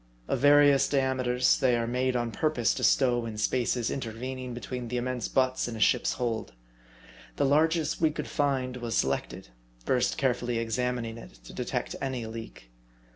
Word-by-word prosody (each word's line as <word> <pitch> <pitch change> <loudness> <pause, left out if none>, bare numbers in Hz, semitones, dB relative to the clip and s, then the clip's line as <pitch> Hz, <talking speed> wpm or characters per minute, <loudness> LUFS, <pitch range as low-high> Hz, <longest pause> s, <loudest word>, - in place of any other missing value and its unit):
Of - - -1
various 145 0 +5
diameters, 130 -2 +2
they 125 -4 +3
are 115 - -1
made 125 +2 0
on 120 -1 -1
purpose 130 0 +1
to - - -5
stow 120 -3 +3
into 110 -1 -6
spaces 120 +1 0
intervening 125 +1 -5
between 125 0 -5
the 125 +2 -3
immense 125 -1 -2
butts 130 -1 +1
in 120 - -5
a - - -6
ship's 105 - +3
hold. 115 - -3 0.8
The - - +1
largest 155 +2 +2
we 160 - +4
could 155 - -5
find 130 -4 -1
was 120 -2 -3
selected, - - -2 0.4
first 125 -1 +1
carefully 125 -2 0
examining 115 0 -2
it - - -12
to - - -12
detect - - -3
any 130 -4 -3
leak. 110 - -9
125 Hz, 165 wpm, -28 LUFS, 115-130 Hz, 0.8 s, various